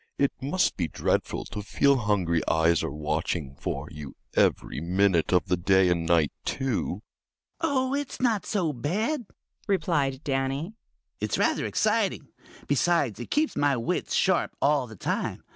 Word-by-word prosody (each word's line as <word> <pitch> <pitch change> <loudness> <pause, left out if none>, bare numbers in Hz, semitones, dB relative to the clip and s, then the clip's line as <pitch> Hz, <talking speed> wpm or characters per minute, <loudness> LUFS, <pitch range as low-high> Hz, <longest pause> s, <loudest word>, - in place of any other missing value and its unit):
It 140 - +2
must 150 +8 +1
be 85 - 0
dreadful - - -1
to 105 - -6
feel 140 +7 +3
hungry 95 -7 +1
eyes 80 +1 +3
are - - -2
watching 75 0 -2
for - - -4
you 75 -2 -9 0.2
every 75 - +1
minute 90 0 +2
of 90 -1 +3
the 90 - +1
day 95 +1 +4
and 85 -2 0
night, 80 -4 +3
too." 115 -6 -2 0.6
"Oh, 275 -5 +1
it's 285 -1 -3
not 230 -6 +1
so 175 -8 0
bad," 210 - -1 0.4
replied 150 -9 0
Danny. 135 +6 -1 0.5
"It's - - -1
rather - - +1
exciting. 215 -8 0 0.4
Besides, 145 - +1
it 120 - -7
keeps 305 +1 +1
my 145 -2 +2
wits 115 - -1
sharp - - +2
all 140 -3 +2
the 110 - -11
time. - - -3
130 Hz, 150 wpm, -27 LUFS, -, 0.6 s, day